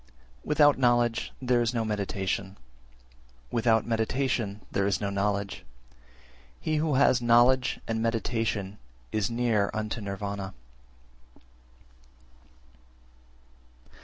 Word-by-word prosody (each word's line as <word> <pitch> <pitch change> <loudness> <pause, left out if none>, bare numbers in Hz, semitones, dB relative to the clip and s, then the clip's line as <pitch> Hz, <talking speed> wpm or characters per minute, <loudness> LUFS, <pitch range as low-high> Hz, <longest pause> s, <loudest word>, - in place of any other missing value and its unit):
372. - - -9
Without 145 -2 +5
knowledge 120 -2 +2
there 125 -2 +2
is 120 +1 0
no 115 -1 0
meditation, 100 -2 -3 0.9
without 115 -2 +2
meditation 115 -2 -1
there 100 0 +1
is 100 - 0
no 100 -2 -2
knowledge: 100 0 -2 1.0
he 155 -1 -1
who 150 -2 +1
has 130 -2 +4
knowledge 120 +2 +4
and 110 0 -1
meditation 115 -3 -2 0.3
is 110 0 0
near 115 -4 +1
unto 110 +1 -3
Nirvana. 100 -1 -5
115 Hz, 100 wpm, -27 LUFS, 100-120 Hz, 1.0 s, Without